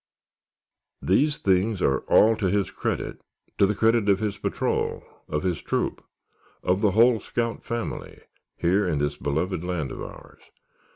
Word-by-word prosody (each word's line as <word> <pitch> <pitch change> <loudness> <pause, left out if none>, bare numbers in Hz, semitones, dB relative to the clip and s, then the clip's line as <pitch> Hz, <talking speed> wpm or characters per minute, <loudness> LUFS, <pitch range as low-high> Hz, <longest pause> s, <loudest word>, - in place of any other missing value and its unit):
These 145 +11 +2
things 95 +2 +1
are 70 -6 +2
all 110 +1 +5
to 100 - 0
his 100 +1 0
credit—to 100 - -3
the 105 - 0
credit 110 0 +3
of 100 - +5
his 105 -1 -3
patrol, - - -1 0.3
of 75 0 -2
his 90 -3 -1
troop, - - -2 0.6
of 95 +2 +1
the 105 - +4
whole 115 0 +6
scout 115 +1 -3
family, 115 0 -5 0.4
here 95 +3 +2
in 80 -4 0
this 75 0 -1
beloved 80 +5 -2
land 90 -7 -3
of - - -7
ours. - - -11
100 Hz, 150 wpm, -25 LUFS, 90-110 Hz, 0.6 s, whole